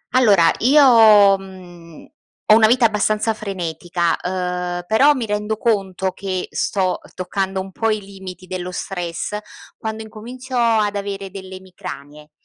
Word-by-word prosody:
Allora, 200 -10 +5
io, 225 -7 +6
mhmm, 175 -4 -13 0.4
ho 215 - +6
una 220 -1 +6
vita 245 +1 +3
abbastanza 215 +1 +1
frenetica, 175 -4 -2
uhm, 180 -1 -3
però 265 +9 +4
mi 250 -4 -3
rendo 210 +1 -2
conto 195 -5 -1
che 185 -1 -4
sto 185 -2 -1 0.2
toccando 190 +1 -3
un 190 0 -6
po' 225 +4 -1
i 215 -1 0
limiti 190 -2 -11
dello 180 0 -5
stress 180 +2 -4 0.4
quando 220 0 -5
incomincio 245 +4 -9
ad 220 -4 +2
avere 200 -1 -5
delle 190 -1 -9
emicranie. 150 -5 -10
195 Hz, 135 wpm, -20 LUFS, 180-220 Hz, 0.4 s, io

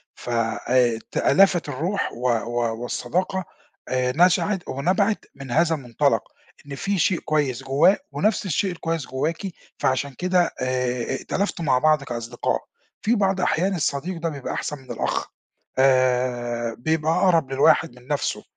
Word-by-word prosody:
ف - - -9
آآ 120 +1 +1
تألفت 185 -5 +3
الروح 165 +9 -2
و 125 +2 -1
و 120 0 -1
والصداقة 185 +9 -2 0.5
آآ 125 0 0
نشأت 180 +3 +3
ونَبَعِت 190 +10 0
من 135 -2 -9
هذا 165 +4 +3
المُنطلَق، 125 -6 +1 0.5
إن 140 - -6
في 195 +5 -1
شيء 175 +1 +2
كويّس 140 -4 -1
جوّاه 140 +9 +4
ونَفس 210 -1 0
الشيء 190 +2 0
الكويّس 165 -4 -3
جواكِ 150 +5 -1 0.4
فعشان 130 +2 0
كده 180 +3 +1
آآ 125 -1 0
ائتلفتوا 190 +3 -2
مع 130 -3 +3
بعض 155 0 +3
كأصدقاء. 120 -2 -2 0.4
في 230 +3 +2
بعض 195 -3 +1
أحيان 185 +2 +1
الصديق 165 +2 -2
ده 165 - 0
بيبقى 140 -4 -5
أحسَن 150 - -3
من 130 -2 -11
الأخ - - -2 0.5
آآ 125 -3 +2
بيبقى 160 +4 +1
أقرَب 165 -7 +3
للواحد 140 +2 +4
من 125 0 -17
نَفسُه، 145 0 -1
140 Hz, 140 wpm, -23 LUFS, 125-175 Hz, 0.5 s, جوّاه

